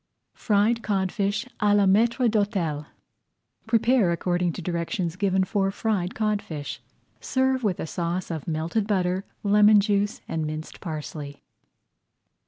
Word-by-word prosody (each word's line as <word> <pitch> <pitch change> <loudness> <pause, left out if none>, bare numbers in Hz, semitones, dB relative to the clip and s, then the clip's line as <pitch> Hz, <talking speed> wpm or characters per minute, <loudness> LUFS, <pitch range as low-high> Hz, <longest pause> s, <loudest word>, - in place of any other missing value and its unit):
FRIED 220 +2 +1
CODFISH 200 +1 -1
À 205 -1 +3
LA 205 - +4
MAÎTRE 230 +6 +3
D'HÔTEL 195 -9 0 0.8
Prepare 230 -3 +3
according 175 +1 0
to - - -7
directions 170 +1 -2
given 190 -1 +1
for 195 0 0
Fried 195 -3 -1
Codfish. 205 -9 -3 0.4
Serve 260 -1 0
with 195 -5 0
a - - -2
sauce 170 +2 -3
of 160 -4 -5
melted 165 +6 -1
butter, 185 -2 0 0.2
lemon 210 +1 +6
juice, 205 0 0
and 160 -1 -2
minced 155 +1 -6
parsley. 150 -3 -6
195 Hz, 125 wpm, -25 LUFS, 170-210 Hz, 0.8 s, lemon